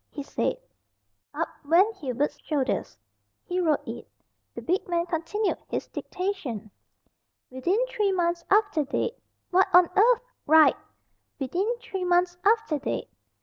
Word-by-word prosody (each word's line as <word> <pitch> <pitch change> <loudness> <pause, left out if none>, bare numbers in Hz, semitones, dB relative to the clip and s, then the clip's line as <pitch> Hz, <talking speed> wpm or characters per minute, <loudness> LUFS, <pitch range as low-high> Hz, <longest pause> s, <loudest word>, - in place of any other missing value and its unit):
he 285 - -6
said. 280 - -1 0.7
Up - - -2 0.2
went 365 +9 +4
Hubert's 285 0 -2
shoulders 285 -4 -2 0.5
he 360 0 -2
wrote 320 -4 +1
it. - - -7 0.5
The - - -7
big 365 +3 0
man 345 -1 0
continued 350 +5 -1
his - - -3
dictation. 275 - -4 0.8
"'Within 260 +10 0
three 425 -5 0
months 345 -2 0
after 405 -6 +3
date.'" 455 - -2 0.3
"What 375 +1 +5
on 360 -1 +7
earth 470 +4 +5 0.2
" - - -48
"Write 315 - +7 0.6
'Within 370 - -1
three 430 -6 -5
months 355 0 +2
after 430 -7 +2
date.'" - - -3
355 Hz, 135 wpm, -26 LUFS, 300-405 Hz, 0.8 s, on